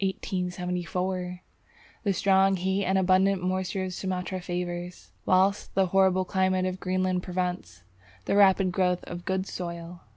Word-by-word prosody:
The 180 Hz, -1 st, -2 dB, 0.7 s
strong 195 Hz, +1 st, +3 dB
heat 190 Hz, +2 st, 0 dB
and 190 Hz, +1 st, +2 dB
abundant 190 Hz, 0 st, +3 dB
moisture 185 Hz, +1 st, -1 dB
of 185 Hz, -1 st, -4 dB
Sumatra 185 Hz, 0 st, -3 dB
favours, 175 Hz, 0 st, -5 dB, 0.2 s
whilst 190 Hz, +2 st, +2 dB
the 195 Hz, 0 st, +4 dB
horrible 190 Hz, -1 st, +4 dB
climate 185 Hz, 0 st, +1 dB
of 185 Hz, 0 st, -3 dB
Greenland 185 Hz, -1 st, 0 dB
prevents, 180 Hz, -, -4 dB, 0.4 s
the -, -, +1 dB
rapid 195 Hz, -2 st, +5 dB
growth 180 Hz, -1 st, +1 dB
of 175 Hz, 0 st, -8 dB
good 190 Hz, 0 st, -1 dB
soil. 170 Hz, -2 st, -6 dB
185 Hz, 130 wpm, -27 LUFS, 180-190 Hz, 0.7 s, rapid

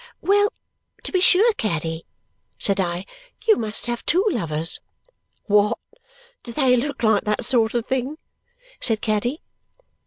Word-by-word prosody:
"Well, 410 Hz, +1 st, +3 dB, 0.5 s
to -, -, -5 dB
be 370 Hz, -, +1 dB
sure, 415 Hz, +6 st, +5 dB
Caddy!" 165 Hz, -, -3 dB, 0.5 s
said 200 Hz, -1 st, +1 dB
I. 175 Hz, 0 st, -1 dB, 0.4 s
"You 440 Hz, -2 st, +6 dB
must 220 Hz, -, -3 dB
have 240 Hz, 0 st, -3 dB
two 365 Hz, +6 st, +2 dB
lovers!" 165 Hz, -, 0 dB, 0.6 s
"What? 210 Hz, 0 st, +3 dB, 0.6 s
Do 235 Hz, -, -9 dB
they 255 Hz, 0 st, +3 dB
look 280 Hz, +2 st, -2 dB
like 220 Hz, -2 st, +3 dB
that 210 Hz, 0 st, 0 dB
sort 230 Hz, -3 st, +2 dB
of 235 Hz, -1 st, 0 dB
thing?" 265 Hz, +3 st, -2 dB, 0.6 s
said 225 Hz, -3 st, +1 dB
Caddy. 240 Hz, +6 st, -1 dB
235 Hz, 135 wpm, -22 LUFS, 205-290 Hz, 0.6 s, You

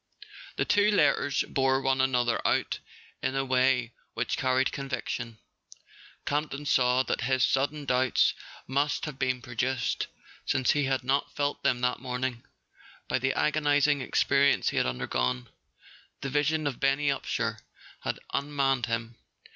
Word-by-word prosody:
The -, -, 0 dB
two 205 Hz, +1 st, +4 dB
letters 145 Hz, -8 st, +2 dB
bore 135 Hz, 0 st, +2 dB
one 135 Hz, -1 st, +1 dB
another 125 Hz, -3 st, +1 dB
out -, -, +1 dB, 0.4 s
in 130 Hz, +1 st, -1 dB
a 135 Hz, 0 st, 0 dB
way 130 Hz, -2 st, +2 dB, 0.2 s
which -, -, -1 dB
carried 130 Hz, 0 st, +1 dB
conviction. 125 Hz, -4 st, -4 dB, 0.9 s
Campton 145 Hz, 0 st, -2 dB
saw 125 Hz, -2 st, +3 dB
that -, -, -2 dB
his 130 Hz, +1 st, +1 dB
sud¬ 135 Hz, +1 st, +2 dB
den 150 Hz, -1 st, -9 dB
doubts 125 Hz, -1 st, +3 dB, 0.3 s
must 145 Hz, +3 st, 0 dB
have 150 Hz, -3 st, -7 dB
been 130 Hz, -2 st, 0 dB
produced 125 Hz, +1 st, -1 dB, 0.4 s
(since 130 Hz, -2 st, +2 dB
he 145 Hz, -1 st, +1 dB
had 135 Hz, -1 st, 0 dB
not 135 Hz, +3 st, 0 dB
felt 145 Hz, 0 st, -1 dB
them 125 Hz, -1 st, +1 dB
that 125 Hz, 0 st, 0 dB
morning) 125 Hz, -1 st, -3 dB, 0.6 s
by 125 Hz, -, 0 dB
the 135 Hz, +1 st, 0 dB
agonizing 145 Hz, -1 st, +2 dB
experi¬ 140 Hz, +2 st, +3 dB
ence -, -, +1 dB
he -, -, -4 dB
had -, -, +2 dB
undergone: 60 Hz, 0 st, -2 dB, 0.7 s
the 140 Hz, -, -4 dB
vision 150 Hz, +2 st, +1 dB
of 140 Hz, -4 st, -2 dB
Benny 140 Hz, +1 st, +2 dB
Upsher 140 Hz, -, -2 dB, 0.4 s
had -, -, -3 dB, 0.2 s
unmanned 140 Hz, -3 st, 0 dB
him. 115 Hz, 0 st, -3 dB
130 Hz, 145 wpm, -28 LUFS, 125-140 Hz, 0.9 s, two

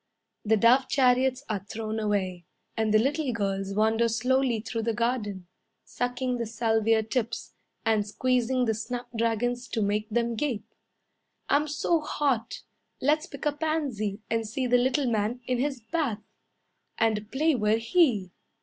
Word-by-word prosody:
The 220 Hz, +1 st, +3 dB
dove 250 Hz, +5 st, +5 dB
chariots 260 Hz, 0 st, +3 dB
are 210 Hz, -2 st, -1 dB
thrown 220 Hz, +2 st, -4 dB
away, 190 Hz, -5 st, -1 dB, 0.3 s
And 220 Hz, -1 st, +1 dB
the 215 Hz, -, +6 dB
little 275 Hz, +4 st, +1 dB
girls 195 Hz, -3 st, -2 dB
wander 220 Hz, +2 st, +3 dB
slowly 250 Hz, +1 st, +1 dB
through 230 Hz, +1 st, -4 dB
the 225 Hz, 0 st, -1 dB
garden, 210 Hz, -5 st, -1 dB, 0.4 s
Sucking 245 Hz, 0 st, -2 dB
the 235 Hz, -, -2 dB
salvia 225 Hz, 0 st, +2 dB
tips, 230 Hz, +1 st, -3 dB, 0.3 s
And 215 Hz, -2 st, +2 dB
squeezing 250 Hz, +3 st, +1 dB
the 220 Hz, -, +1 dB
snapdragons 240 Hz, +1 st, -2 dB
To 225 Hz, -, -2 dB
make 210 Hz, +1 st, -1 dB
them 235 Hz, +1 st, 0 dB
gape. 225 Hz, -4 st, -2 dB, 0.8 s
"I'm 295 Hz, +2 st, +3 dB
so 310 Hz, +3 st, +1 dB
hot, 280 Hz, -6 st, -1 dB, 0.4 s
Let's 305 Hz, +4 st, +2 dB
pick -, -, -8 dB
a 295 Hz, -, +3 dB
pansy 280 Hz, -10 st, -2 dB
And 225 Hz, -1 st, -1 dB
see 255 Hz, +4 st, -2 dB
the 245 Hz, 0 st, +4 dB
little 265 Hz, +3 st, +1 dB
man 230 Hz, +1 st, 0 dB
in 250 Hz, -1 st, 0 dB
his 270 Hz, -2 st, -1 dB
bath, 230 Hz, -4 st, -2 dB, 0.7 s
And 215 Hz, -1 st, 0 dB
play 310 Hz, +4 st, +2 dB
we're 215 Hz, -3 st, +2 dB
he." 230 Hz, -, +2 dB
230 Hz, 150 wpm, -27 LUFS, 215-260 Hz, 0.8 s, the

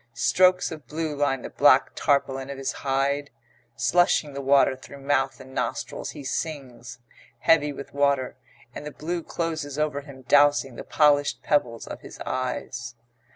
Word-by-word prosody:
Strokes 185 Hz, +7 st, +3 dB
of 155 Hz, -6 st, -9 dB
blue 155 Hz, +1 st, -3 dB
line 135 Hz, -3 st, 0 dB
the -, -, -7 dB
black -, -, +5 dB
tarpaulin 135 Hz, -1 st, 0 dB
of 140 Hz, -, -6 dB
his 135 Hz, -1 st, -2 dB
hide. 140 Hz, +1 st, 0 dB, 0.5 s
Slushing 175 Hz, -3 st, +2 dB
the 140 Hz, -, -4 dB
water 135 Hz, -1 st, +4 dB
through 135 Hz, +2 st, -12 dB
mouth 135 Hz, -1 st, 0 dB
and 130 Hz, 0 st, -12 dB
nostrils -, -, -3 dB
he 145 Hz, -, -8 dB
sings, 130 Hz, -5 st, -5 dB, 0.4 s
heavy 150 Hz, -2 st, +4 dB
with 140 Hz, 0 st, -9 dB
water, 140 Hz, -3 st, +1 dB, 0.4 s
and -, -, -7 dB
the 150 Hz, -, -5 dB
blue 170 Hz, +4 st, -4 dB
closes 160 Hz, -4 st, -4 dB
over 150 Hz, -2 st, -1 dB
him 140 Hz, -2 st, -13 dB
dowsing 145 Hz, -1 st, +4 dB
the -, -, -7 dB
polished 145 Hz, -2 st, +2 dB
pebbles 120 Hz, -6 st, 0 dB
of -, -, -8 dB
his -, -, -11 dB
eyes. 125 Hz, -2 st, -4 dB
140 Hz, 155 wpm, -25 LUFS, 135-150 Hz, 0.5 s, black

